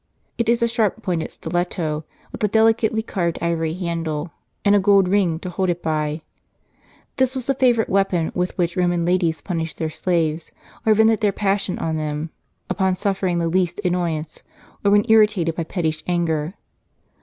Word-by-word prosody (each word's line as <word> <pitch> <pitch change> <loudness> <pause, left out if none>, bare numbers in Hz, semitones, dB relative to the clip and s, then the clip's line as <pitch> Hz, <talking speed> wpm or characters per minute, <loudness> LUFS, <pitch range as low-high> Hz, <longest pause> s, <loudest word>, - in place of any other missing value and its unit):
It 230 -1 +1
is 235 0 +3
a - - +4
sharp 225 -2 0
pointed 170 -3 -2
stiletto, 160 -2 -2 0.3
with - - -7
a - - +4
delicately 220 +1 +2
carved 175 -6 -2
ivory 165 -2 -1
handle, 165 -3 -3 0.3
and 200 - +5
a 205 - +5
gold 195 -1 +4
ring, 185 -4 +2
to 180 - -5
hold 185 +1 -1
it 175 0 -2
by. 155 0 -1 1.0
This 260 0 +2
was 255 -2 -3
the 275 - +1
favorite 245 -4 +2
weapon 190 -4 +1
with 180 0 -2
which 175 -1 0
Roman 175 -2 +1
ladies 170 -3 +1
punished 165 -3 -4
their 160 -1 -2
slaves, 165 -2 -1 0.4
or 215 - +6
vented 220 +1 +4
their 210 -2 +3
passion 195 -1 0
on 160 -1 -2
them, 155 +1 -3 0.4
upon 190 -2 +1
suffering 190 -2 -1
the 170 -1 0
least 175 +1 0
annoyance, 170 -4 -2 0.4
or 200 - +4
when 205 +1 +4
irritated 210 -6 +4
by 165 0 -3
pettish 160 -3 -2
anger. 170 -1 -1
180 Hz, 170 wpm, -21 LUFS, 165-205 Hz, 1.0 s, or